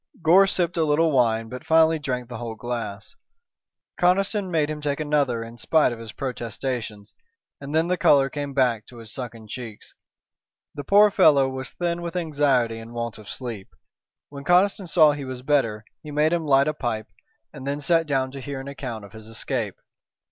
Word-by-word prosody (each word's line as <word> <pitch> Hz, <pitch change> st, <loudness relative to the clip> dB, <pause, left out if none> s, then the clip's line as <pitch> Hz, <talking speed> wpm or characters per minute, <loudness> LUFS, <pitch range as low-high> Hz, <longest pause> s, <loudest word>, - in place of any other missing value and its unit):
Gore 185 Hz, +5 st, +6 dB
sipped 175 Hz, -3 st, 0 dB
a 165 Hz, -, +3 dB
little 155 Hz, +2 st, +2 dB
wine 115 Hz, -4 st, +2 dB
but 125 Hz, +4 st, -8 dB
finally 160 Hz, 0 st, +4 dB
drank 125 Hz, -4 st, -3 dB
the 120 Hz, -2 st, -7 dB
whole 115 Hz, -2 st, -5 dB
glass. 115 Hz, -3 st, -5 dB, 0.9 s
Conniston 195 Hz, +2 st, +2 dB
made 160 Hz, -4 st, +1 dB
him 155 Hz, 0 st, -5 dB
take 145 Hz, -1 st, -2 dB
another 145 Hz, -6 st, 0 dB
in 115 Hz, +1 st, -11 dB
spite 155 Hz, -1 st, +3 dB
of 120 Hz, -, -6 dB
his 115 Hz, -2 st, -8 dB
protestations, 120 Hz, -4 st, -5 dB, 0.5 s
and 140 Hz, +2 st, -6 dB
then 160 Hz, +1 st, +3 dB
the 180 Hz, 0 st, 0 dB
color 140 Hz, -2 st, +5 dB
came 140 Hz, 0 st, -5 dB
back 120 Hz, -6 st, +1 dB
to 120 Hz, -, -14 dB
his 115 Hz, -2 st, -9 dB
sunken 115 Hz, -4 st, -7 dB
cheeks. 115 Hz, -2 st, -9 dB, 0.8 s
The 145 Hz, -, -6 dB
poor 205 Hz, +6 st, +6 dB
fellow 150 Hz, -9 st, +5 dB
was 130 Hz, 0 st, -6 dB
thin 175 Hz, -1 st, -2 dB
with 170 Hz, 0 st, -5 dB
anxiety 140 Hz, -9 st, +1 dB
and 115 Hz, +1 st, -10 dB
want 115 Hz, -2 st, -4 dB
of 105 Hz, -, -12 dB
sleep. 115 Hz, -7 st, -6 dB, 0.6 s
When 140 Hz, -1 st, -9 dB
Conniston 185 Hz, +4 st, +3 dB
saw 155 Hz, -3 st, +5 dB
he 145 Hz, -1 st, -5 dB
was 130 Hz, -1 st, -7 dB
better 115 Hz, -7 st, +1 dB, 0.2 s
he 150 Hz, -, -10 dB
made 150 Hz, +2 st, +2 dB
him 165 Hz, -3 st, -1 dB
light 140 Hz, 0 st, +4 dB
a 155 Hz, -, +1 dB
pipe 115 Hz, -6 st, -3 dB, 0.4 s
and 135 Hz, -3 st, -8 dB
then 140 Hz, +1 st, -2 dB
sat 165 Hz, +2 st, +2 dB
down 135 Hz, -2 st, 0 dB
to 135 Hz, 0 st, -8 dB
hear 140 Hz, 0 st, -5 dB
an 135 Hz, -, -8 dB
account 125 Hz, -6 st, -6 dB
of 100 Hz, -, -16 dB
his 110 Hz, -1 st, -11 dB
escape. 115 Hz, -2 st, -3 dB
135 Hz, 190 wpm, -24 LUFS, 115-155 Hz, 0.9 s, Gore